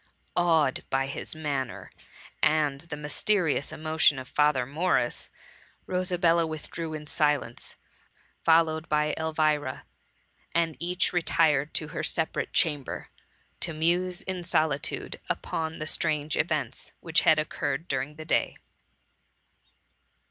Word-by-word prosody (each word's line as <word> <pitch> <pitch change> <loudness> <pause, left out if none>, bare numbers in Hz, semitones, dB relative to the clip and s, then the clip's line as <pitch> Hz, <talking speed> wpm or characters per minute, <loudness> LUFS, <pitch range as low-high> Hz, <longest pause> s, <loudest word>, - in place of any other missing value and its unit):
*" - - -43
Awed 160 -6 +3
by 135 0 +1
his 140 +3 -4
manner, 140 -5 -3 0.5
and 150 -3 +2
the 165 -3 -7
mysterious 150 +1 0
104 - - -5
THE 155 - -12
MUMMY. 155 - -3
Amotion 160 -3 +5
of 130 0 -6
Father 150 -4 +3
Morris, 145 -2 0 0.6
Rosabella 175 -2 +2
withdrew 160 +1 -5
in 150 -1 -7
silence, 150 -5 -1 0.7
followed 160 0 +3
by 150 0 +2
Elvira, 155 -4 0 0.7
and 165 -2 +2
each 180 +3 0
retired 155 -4 +2
to 155 - -1
her - - -4
separate 160 -1 -1
chamber, 145 -5 0 0.5
to 170 - -2
muse 175 +3 +1
in 185 -2 -3
solitude 155 -5 0
upon 160 0 -2
the 155 - -4
strange 155 -1 +1
events 150 -6 -2
which 165 -1 +2
had 160 - +5
occurred 155 0 -2
during 135 +2 -2
the 155 +1 -9
day. - - +1
155 Hz, 125 wpm, -27 LUFS, 150-165 Hz, 0.7 s, Amotion